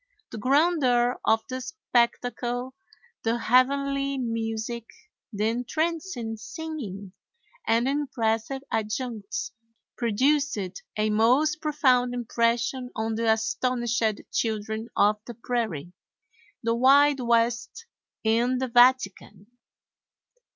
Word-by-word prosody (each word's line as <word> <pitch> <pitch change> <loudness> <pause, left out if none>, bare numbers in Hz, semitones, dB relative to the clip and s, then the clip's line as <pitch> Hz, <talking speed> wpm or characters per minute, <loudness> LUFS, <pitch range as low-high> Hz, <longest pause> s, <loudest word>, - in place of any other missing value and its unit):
The 220 - -6
grandeur 255 -2 +2
of 220 0 +3
the 255 0 -5
spectacle, 245 - -1 0.5
the 230 +1 0
heavenly 275 +3 +2
music, 230 -1 -3 0.4
the 210 0 0
entrancing 250 -1 -2
singing, 215 - -7 0.5
and 230 +2 +3
impressive 265 -2 -1
adjuncts 220 -1 -3 0.4
produced 275 +5 +1 0.4
a 215 0 +1
most 260 +9 +3
profound 255 -5 +2
impression 240 +1 0
on 225 0 -2
the 225 0 +2
astonished 240 +1 0 0.3
children 220 0 -2
of 210 +1 +4
the 240 - -7
prairie. 215 - -3 0.7
The 230 0 +1
Wild 275 +4 +5
West 235 - 0 0.4
in 235 +3 +2
the 260 0 -2
Vatican! 240 -5 +3
240 Hz, 95 wpm, -26 LUFS, 225-265 Hz, 0.7 s, Wild